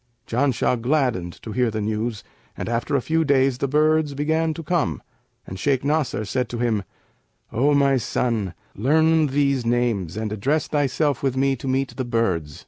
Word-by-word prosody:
Janshah 125 -1 +1
gladdened 125 - 0
to 110 - -6
hear 125 +1 +1
the 110 0 -3
news; 110 +1 -2 0.3
and - - -4
after 120 +4 -1
a 135 - +1
few 160 0 +1
days 135 -3 +2
the 140 - 0
birds 155 +1 +2
began 160 +3 +1
to 165 - -6
come 145 - -1 0.4
and 95 - -8
Shaykh 135 +1 +1
Nasr 140 -8 0
said 125 +3 -1
to 120 - -4
him, 115 -3 0 0.7
'O 145 +5 +3
my 140 -1 +4
son, 110 -6 -1 0.2
learn 160 +6 +3
these 140 -2 +1
names[FN#560] 115 -7 0
and 110 -1 -3
address 135 +8 0
thyself 145 -2 0
with 135 -2 -1
me 135 0 +2
to 135 - -8
meet 130 +1 -1
the 130 - -1
birds.' 95 - -1
130 Hz, 175 wpm, -23 LUFS, 115-145 Hz, 0.7 s, my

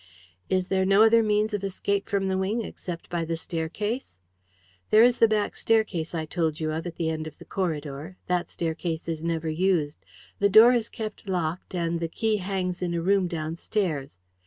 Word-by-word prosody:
"Is 185 -1 0
there 190 -1 +2
no 195 +3 +5
other 230 +1 +6
means 215 0 +1
of 205 -1 -2
escape 200 +2 -1
from 200 -2 0
the 190 - 0
wing 210 +5 0
except 175 -4 -7
by 170 -1 -2
the 165 0 -2
staircase?" 175 - -4 0.7
"There 215 +1 +7
is 245 0 +4
the 230 - +7
back 215 -1 0
staircase 200 -8 0
I 160 -1 -2
told 160 -1 -1
you 155 -1 -1
of, 160 +3 -3
at 170 - -7
the 160 -1 -1
end 155 0 -4
of 155 - -10
the - - -13
corridor. 155 -2 -4
That 180 -1 -1
staircase 165 0 -3
is 160 -1 -3
never 165 -1 -1
used. 160 -2 0 0.4
The 200 - +4
door 220 +5 +8
is 235 -2 0
kept 215 -2 -6
locked, 180 0 -2
and 170 -1 -1
the 165 - -1
key 220 +5 0
hangs 185 -2 -3
in 175 -1 -1
a 170 - -1
room 195 0 +3
downstairs. 160 - -3
180 Hz, 195 wpm, -26 LUFS, 165-205 Hz, 0.7 s, door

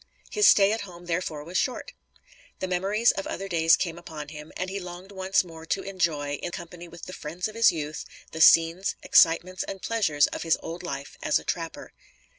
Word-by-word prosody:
His 420 0 +4
stay 200 0 +6
at 225 - -1
home 175 -3 -10
therefore 165 -3 -3
was 175 +4 -1
short. 265 - -2 0.7
The 185 - -3
memories 195 +6 +2
of 195 - -5
other 195 - -4
days 165 -3 +4
came 170 -2 -3
upon 155 -3 -8
him, 150 0 -10
and 185 - -2
he 195 +2 -4
longed 180 +1 -9
once 190 0 +1
more 165 -2 -11
to 195 - -1
enjoy, 160 -7 -1
in - - -3
company 175 0 -9
with 170 0 -11
the 185 - -8
"friends 175 +5 -4
of 215 - -9
his 225 -2 +5
youth," 155 -2 -5 0.3
the 160 - -4
scenes, 165 +4 +5
excitements 180 +2 +4
and 195 - -5
pleasures 185 -11 +2
of - - -5
his 165 -1 +2
old 165 +2 -6
life 140 -6 -6
as - - +2
a - - -6
trapper. 165 -2 -5
175 Hz, 205 wpm, -26 LUFS, 165-190 Hz, 0.7 s, stay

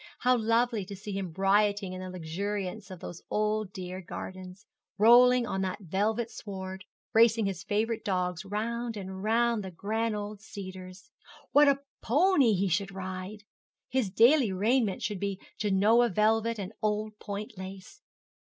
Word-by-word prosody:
How 250 0 +4
lovely 230 -1 +1
to 200 +1 -8
see 205 +2 -7
him 195 -3 -3
rioting 200 0 +2
in 185 - -6
the 185 - -6
luxuriance 190 +4 -4
of 185 -3 -9
those 175 - -7
dear - - -31
old 190 -4 -2
gardens, 185 +1 -8 0.3
rolling 245 +3 +6
on 190 -5 -2
that 185 -1 -2
velvet 215 +6 -1
sward, 190 -1 -7 0.3
racing 225 -1 +5
his 195 -3 -3
favourite 220 +3 -1
dogs 180 -4 -1
round 225 +3 -3
and 190 -1 -6
round 230 +1 +2
the 190 - -5
grand 215 +5 -2
old 205 0 -6
cedars! 185 +2 -9 0.4
What 290 0 +6
a 275 0 +1 0.2
pony 285 - +4
he 195 +2 +1
should 195 +2 0
ride! 190 +2 -6 0.5
His 255 -6 0
daily 235 +3 +5
raiment 210 +1 +1
should 205 -3 -2
be 200 -1 -3 0.2
Genoa 215 +4 +4
velvet 225 +3 +2
and 200 +1 -6
old 215 0 -1
point 210 +2 -6
lace. 190 0 -9
205 Hz, 155 wpm, -29 LUFS, 190-225 Hz, 0.5 s, rolling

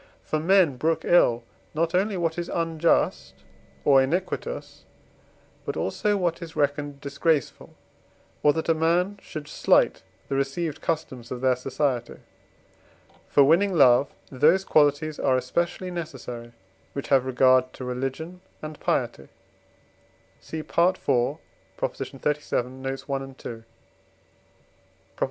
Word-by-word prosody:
For 155 - -1
men 170 -4 +4
brook 160 +4 0
ill 120 -9 +4 0.3
not 165 +2 0
only 195 +2 +1
what 170 -1 -1
is 170 - -4
unjust 165 - 0 0.5
or 135 -2 +6
iniquitous, 180 - -3 0.8
but - - -4
also 210 -1 0
what 175 -3 -1
is 165 -1 -8
reckoned 145 -1 -1
disgraceful, 145 +1 -1 0.7
or 150 - +5
that 160 - -3
a 165 - +4
man 175 +5 +1
should 155 -2 -8
slight - - +2 0.3
the - - -4
received 140 +3 -2
customs 130 -7 -3
of 125 - -5
their 130 -1 +3
society. 125 -1 -2 1.1
For 145 - +5
winning 180 +7 +3
love 130 -3 +5 0.2
those 155 +8 +3
qualities 150 0 +2
are 130 - +2
especially 170 +8 -2
necessary 125 -8 -7 0.4
which 140 - -5
have 130 -2 +3
regard 130 0 +4
to 130 - -7
religion 135 +8 -4 0.2
and 155 0 -8
piety 70 - -1 1.1
(cf. 160 - -6
IV. 150 -6 +1 0.4
xxxvii. 145 -1 -2
notes. 135 +1 -5
i. 135 -1 -5
ii. 115 -1 -10
150 Hz, 120 wpm, -25 LUFS, 130-170 Hz, 1.1 s, or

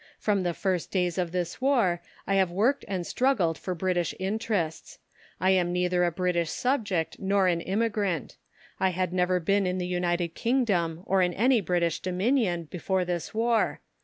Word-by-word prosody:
From 205 -2 +1
the 175 -2 -1
first 185 -4 -1
days 180 -2 0
of 175 -2 -1
this 180 +4 -3
War 230 -11 +2 0.2
I 195 - 0
have 190 -2 +3
worked 225 +11 +1
and 185 -3 -3
struggled 210 -11 +1
for 185 +3 -4
British 175 -1 -1
interests. 195 -4 -2 0.4
I 185 +2 +3
am 180 -2 +2
neither 180 0 +1
a 175 - +2
British 170 -1 0
subject 205 - -1
nor 195 0 +2
an 170 -2 +1
immigrant. 200 - -1 0.4
I 190 - +3
had 185 -1 -2
never 180 0 +2
been 195 +3 +1
in 180 0 -1
the 180 - -2
United 175 -1 0
Kingdom 195 -10 0
or 195 0 +2
in 180 -1 +1
any 245 +2 +3
British 170 -2 0
Dominion 185 -1 0
before 180 +3 -2
this 175 -2 -3
War. 230 0 +1
185 Hz, 170 wpm, -27 LUFS, 175-200 Hz, 0.4 s, have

